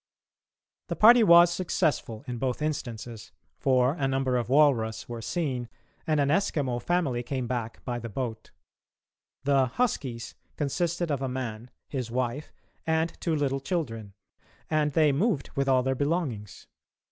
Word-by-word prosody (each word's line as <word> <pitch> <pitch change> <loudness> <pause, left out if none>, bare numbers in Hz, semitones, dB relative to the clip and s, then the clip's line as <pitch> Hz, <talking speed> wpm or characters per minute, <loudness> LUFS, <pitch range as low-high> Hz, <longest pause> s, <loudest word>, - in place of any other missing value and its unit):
] - - -65
The - - -3
party 235 +3 +7
was 170 -2 +7
successful 155 -11 -1
in 120 -2 -4
both 130 -1 -1
instances, 120 -7 -5 0.3
for 130 0 +3
a 145 -5 -1
number 135 -1 0
of 120 -1 -1
walrus 125 -6 +3
were 120 -1 -6
seen 130 -5 -2 0.4
and 155 -2 +2
an 140 -1 +2
Eskimo 145 -8 0
family 150 -7 0
came 130 +1 -3
back 120 -2 -4
by 120 -1 -2
the 115 0 -6
boat. 110 -1 -5 0.9
The 135 -1 +3
"huskies" 125 - -2 0.2
consisted 170 +3 -1
of 140 -2 -1
a 135 - -1
man, 125 -2 -5 0.2
his 130 -4 -4
wife, 125 +4 -2 0.4
and 160 +1 +1
two 165 -2 0
little 135 -2 0
children, 115 - -4 0.6
and 150 -2 +1
they 155 -1 +4
moved 155 - 0
with 140 0 0
all 130 -1 +4
their 130 +1 +1
belongings. 140 - -2
135 Hz, 150 wpm, -27 LUFS, 120-155 Hz, 0.9 s, party